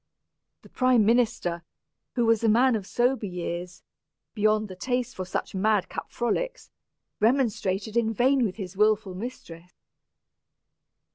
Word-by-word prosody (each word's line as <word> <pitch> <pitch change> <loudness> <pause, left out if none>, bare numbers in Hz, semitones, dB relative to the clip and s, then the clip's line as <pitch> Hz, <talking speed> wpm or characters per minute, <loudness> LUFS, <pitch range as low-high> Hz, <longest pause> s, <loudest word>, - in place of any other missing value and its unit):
The - - -16
prime 255 -4 +3
minister, 220 -7 +1 0.5
who 240 -2 +2
was 230 -1 +3
a 225 - +4
man 240 +3 +4
of 200 -3 -4
sober 245 -2 +1
years, 175 0 -5 0.5
beyond 215 0 +2
the 185 - -9
taste 250 +4 -2
for 185 - -4
such 180 - -4
mad 205 0 +1
cap - - -6
frolics, 370 - -3 0.5
remonstrated 220 -4 +1
in 230 -1 +2
vain 255 +4 +3
with 200 -5 -1
his 195 -3 -7
wilful 210 -1 +2
mistress. 180 -5 -8
215 Hz, 135 wpm, -26 LUFS, 190-240 Hz, 0.5 s, a